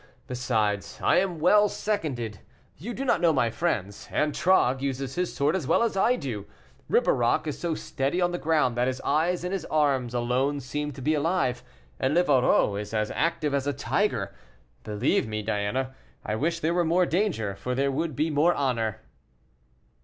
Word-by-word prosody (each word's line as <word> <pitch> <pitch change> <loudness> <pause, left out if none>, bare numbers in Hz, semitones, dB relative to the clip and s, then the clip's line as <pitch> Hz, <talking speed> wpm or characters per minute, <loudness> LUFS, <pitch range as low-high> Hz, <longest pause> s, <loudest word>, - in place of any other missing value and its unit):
Besides, 110 -5 -1
I - - +4
am 180 -2 +1
well 205 +6 +5
seconded 130 - -3 0.4
you 205 - -7
do 270 - -3
not - - +2
know 170 -2 +5
my 120 -6 +1
friends; 105 - -2
Antragues 150 -3 +2
uses 135 -1 -3
his 180 +2 -2
sword 145 +5 +1
as 165 -9 -2
well 165 - +3
as 230 - 0
I 230 +6 +3
do, 115 - -5 0.4
Ribeirac 120 +4 +2
is 150 - -4
so 170 -2 -1
steady 140 +5 -2
on 175 -1 +2
the 175 - -3
ground 150 -6 +1
that 120 +1 +1
his 130 0 -2
eyes 170 +3 +1
and 180 +1 -3
his 195 - -2
arms 135 -6 +1
alone 125 +4 0
seem 145 +3 -4
to 130 - -9
be 155 +3 +2
alive, 150 -5 0 0.4
and 135 +4 +1
Livarot 135 - +3
is 105 +1 -6
as 105 0 0
active 155 -3 0
as 140 0 0
a 145 - +1
tiger. - - -1 0.5
Believe 110 - 0
me, 110 -1 -3
Diana, 110 +5 -1 0.3
I 105 - -2
wish 165 +7 -1
there 160 +2 +1
were 175 0 +2
more 175 +2 +3
danger, 165 - -1
for 125 +5 -3
there 140 +1 +1
would 155 +1 -2
be 155 +4 0
more 155 +4 +3
honor." 115 -6 -1
140 Hz, 185 wpm, -26 LUFS, 125-170 Hz, 0.5 s, well